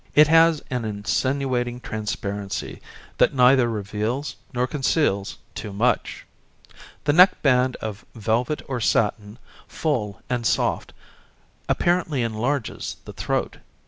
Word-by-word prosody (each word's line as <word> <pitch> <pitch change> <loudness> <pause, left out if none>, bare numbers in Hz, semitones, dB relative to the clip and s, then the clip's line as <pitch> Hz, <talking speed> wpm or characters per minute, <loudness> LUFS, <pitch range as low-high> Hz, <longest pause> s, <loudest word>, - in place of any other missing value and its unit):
It 150 +1 +7
has 165 -1 +5
an 125 -2 -1
insinuating 120 +4 -1
transparency 105 -3 -4 0.4
that - - +4
neither 125 -1 +5
reveals 110 +6 -3 0.2
nor 125 -1 0
conceals 130 -7 0 0.2
too 105 - -6
much. 110 +5 0 0.8
The 145 - +2
neck 180 +4 +6
band 125 -2 +3
of 110 +1 -5
velvet 115 +6 -1
or 130 -3 -3
satin, 105 0 0 0.3
full 120 -11 -2
and 125 -1 -1
soft, 110 - 0 0.8
apparently 170 -7 +1
enlarges 115 +3 -2
the - - -9
throat. - - -2
125 Hz, 110 wpm, -23 LUFS, 110-140 Hz, 0.8 s, It